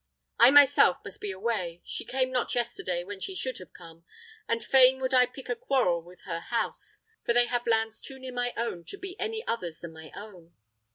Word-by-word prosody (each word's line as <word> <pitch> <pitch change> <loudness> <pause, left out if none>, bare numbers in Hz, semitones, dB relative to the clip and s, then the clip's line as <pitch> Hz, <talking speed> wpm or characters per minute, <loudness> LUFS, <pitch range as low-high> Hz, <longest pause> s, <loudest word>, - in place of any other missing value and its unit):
I 235 - +9
myself 285 -9 +7
must 200 - -7
be 205 - -3
away. 190 -4 -3
She - - -6
came 260 0 0
not 250 -1 -1
yesterday 210 -7 -2
when 200 +1 -8
she 385 - -5
should 260 -8 -3
have 185 - -12
come; 165 0 -14 0.4
and 230 0 0
fain 265 0 +6
would 260 0 -2
I 250 -1 +6
pick 260 +1 -11
a 245 - -1
quarrel 205 -11 +1
with 175 +2 -16
her 165 -2 -4
house, 230 +7 -3 0.2
for 235 - +1
they 240 0 +5
have 240 0 -2
lands 225 -1 +1
too 270 - -8
near 260 -1 -8
my 245 0 -1
own 230 -7 -3
to 400 - -6
be 380 -1 -7
any 445 +3 -3
others 170 -8 -3
than 170 -1 -8
my 160 -1 -12
own. 185 -5 -12
235 Hz, 215 wpm, -28 LUFS, 180-260 Hz, 0.4 s, I